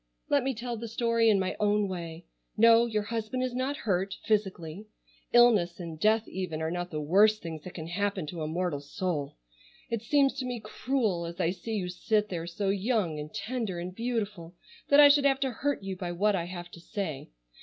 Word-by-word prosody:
Let 285 Hz, -, +4 dB
me 265 Hz, 0 st, -1 dB
tell 235 Hz, +1 st, -4 dB
the 230 Hz, +1 st, -5 dB
story 230 Hz, 0 st, +2 dB
in 205 Hz, -2 st, +4 dB
my 185 Hz, 0 st, -1 dB
own 210 Hz, 0 st, +2 dB
way. 170 Hz, -2 st, -6 dB, 0.3 s
No, 230 Hz, +1 st, +6 dB
your 215 Hz, -2 st, -1 dB
husband 230 Hz, +3 st, -3 dB
is 255 Hz, -1 st, -2 dB
not 260 Hz, +3 st, -1 dB
hurt, 195 Hz, -2 st, -1 dB
physically. 195 Hz, -3 st, -1 dB, 0.4 s
Illness, 215 Hz, -8 st, +5 dB
and 165 Hz, -3 st, -7 dB
death 220 Hz, +4 st, +3 dB
even, 180 Hz, -4 st, -4 dB
are 160 Hz, 0 st, -2 dB
not 175 Hz, 0 st, -3 dB
the 155 Hz, -, -4 dB
worst 205 Hz, +8 st, +4 dB
things 160 Hz, -2 st, -6 dB
that 185 Hz, +4 st, -10 dB
can 160 Hz, -, -5 dB
happen 195 Hz, +1 st, -1 dB
to 165 Hz, +2 st, -6 dB
a 155 Hz, -, -2 dB
mortal 170 Hz, -2 st, -1 dB
soul. 145 Hz, -, -3 dB, 0.5 s
It 230 Hz, -2 st, -1 dB
seems 275 Hz, +3 st, +3 dB
to 255 Hz, -, -2 dB
me 245 Hz, -1 st, -3 dB
cruel, 215 Hz, -5 st, -1 dB
as 170 Hz, +2 st, -8 dB
I 175 Hz, -1 st, +2 dB
see 205 Hz, +5 st, -5 dB
you 190 Hz, -4 st, -2 dB
sit 210 Hz, +4 st, 0 dB
there 170 Hz, -2 st, -4 dB
so 195 Hz, +3 st, -2 dB
young 195 Hz, -5 st, 0 dB
and 150 Hz, +1 st, -7 dB
tender 220 Hz, -3 st, -3 dB
and 175 Hz, +1 st, -5 dB
beautiful, 205 Hz, -6 st, -3 dB, 0.3 s
that 285 Hz, -, +6 dB
I 290 Hz, -, +11 dB
should 285 Hz, 0 st, +5 dB
have 270 Hz, -1 st, +3 dB
to 265 Hz, -2 st, +1 dB
hurt 280 Hz, -1 st, -2 dB
you 195 Hz, -1 st, -4 dB
by 180 Hz, -1 st, -4 dB
what 205 Hz, +4 st, +2 dB
I 170 Hz, -3 st, -1 dB
have 175 Hz, -1 st, -7 dB
to 170 Hz, -, -11 dB
say. 170 Hz, -6 st, -5 dB
200 Hz, 210 wpm, -29 LUFS, 175-230 Hz, 0.5 s, I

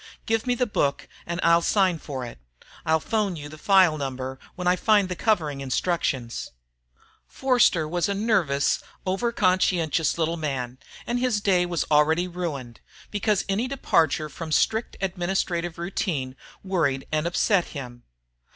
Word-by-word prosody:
Give 225 Hz, +2 st, 0 dB
me 245 Hz, -, +2 dB
the 250 Hz, -, +1 dB
book 140 Hz, -10 st, -1 dB, 0.2 s
and 170 Hz, +1 st, -3 dB
I'll 170 Hz, 0 st, +5 dB
sign 185 Hz, -2 st, +2 dB
for 135 Hz, -5 st, -5 dB
it. 120 Hz, -, -10 dB, 0.5 s
I'll 160 Hz, 0 st, +4 dB
phone 210 Hz, +2 st, -1 dB
you 145 Hz, -2 st, -8 dB
the 155 Hz, -, -11 dB
file 185 Hz, -4 st, +4 dB
number 130 Hz, -1 st, -4 dB, 0.2 s
when 180 Hz, -, -5 dB
I 180 Hz, -, +5 dB
find 205 Hz, 0 st, +3 dB
the 180 Hz, -, -3 dB
covering 160 Hz, -10 st, 0 dB
instructions." 130 Hz, -3 st, -1 dB, 0.8 s
Forster 245 Hz, -, +2 dB
was 175 Hz, +4 st, 0 dB
a 200 Hz, -, 0 dB
nervous, 190 Hz, -10 st, +1 dB, 0.2 s
over 195 Hz, +6 st, 0 dB
conscientious 180 Hz, -6 st, +2 dB
little 165 Hz, 0 st, 0 dB
man, 130 Hz, -5 st, -3 dB, 0.3 s
and 240 Hz, +1 st, -1 dB
his 245 Hz, -4 st, +1 dB
day 185 Hz, -3 st, +2 dB
was 170 Hz, -2 st, -1 dB
already 160 Hz, +4 st, +4 dB
ruined, 150 Hz, -10 st, -5 dB, 0.3 s
because 210 Hz, -1 st, 0 dB
any 205 Hz, +6 st, 0 dB
departure 160 Hz, -, +1 dB
from 160 Hz, +2 st, -7 dB
strict 220 Hz, +8 st, +1 dB
administrative 175 Hz, -2 st, -1 dB
routine 165 Hz, -7 st, -2 dB, 0.3 s
worried 165 Hz, -9 st, 0 dB
and 155 Hz, +1 st, 0 dB
upset 180 Hz, +1 st, +2 dB
him. 125 Hz, -4 st, -8 dB
170 Hz, 150 wpm, -25 LUFS, 150-195 Hz, 0.8 s, I'll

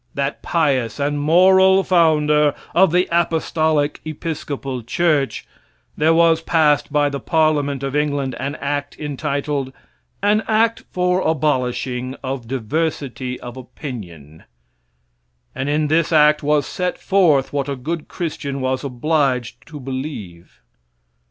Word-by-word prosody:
that 140 Hz, +1 st, -2 dB
pious 135 Hz, -8 st, 0 dB
and 145 Hz, +1 st, 0 dB
moral 190 Hz, +5 st, +5 dB
founder 150 Hz, -4 st, +3 dB, 0.2 s
of 175 Hz, +1 st, +4 dB
the 180 Hz, +2 st, +2 dB
Apostolic 160 Hz, -3 st, +1 dB
Episcopal 145 Hz, -4 st, -5 dB
church, 145 Hz, +3 st, 0 dB, 0.5 s
there 155 Hz, +2 st, +3 dB
was 165 Hz, 0 st, +4 dB
passed 155 Hz, -4 st, +2 dB
by 145 Hz, -1 st, +2 dB
the 140 Hz, -1 st, -3 dB
Parliament 145 Hz, -4 st, +1 dB
of 135 Hz, +1 st, -3 dB
England 145 Hz, -3 st, 0 dB
an 140 Hz, +3 st, -3 dB
act 145 Hz, 0 st, -4 dB
entitled, 140 Hz, -2 st, -3 dB, 0.5 s
"An 210 Hz, +1 st, +3 dB
act 225 Hz, +1 st, +1 dB
for 180 Hz, 0 st, +1 dB
abolishing 130 Hz, -4 st, -1 dB
of 130 Hz, -3 st, -4 dB
diversity 130 Hz, -1 st, -3 dB
of 120 Hz, 0 st, -8 dB
opinion." 90 Hz, -, -9 dB, 1.1 s
And 135 Hz, +2 st, -3 dB
in 150 Hz, +1 st, +1 dB
this 160 Hz, +2 st, +1 dB
act 150 Hz, -1 st, +5 dB
was 150 Hz, 0 st, +1 dB
set 180 Hz, -1 st, -3 dB
forth 155 Hz, -10 st, +2 dB
what 140 Hz, -1 st, -1 dB
a 140 Hz, -, -2 dB
good 155 Hz, +5 st, -5 dB
Christian 150 Hz, -5 st, -4 dB
was 130 Hz, 0 st, -1 dB
obliged 135 Hz, -2 st, -1 dB
to 155 Hz, -3 st, -9 dB
believe. 130 Hz, -, -7 dB
145 Hz, 125 wpm, -20 LUFS, 135-160 Hz, 1.1 s, moral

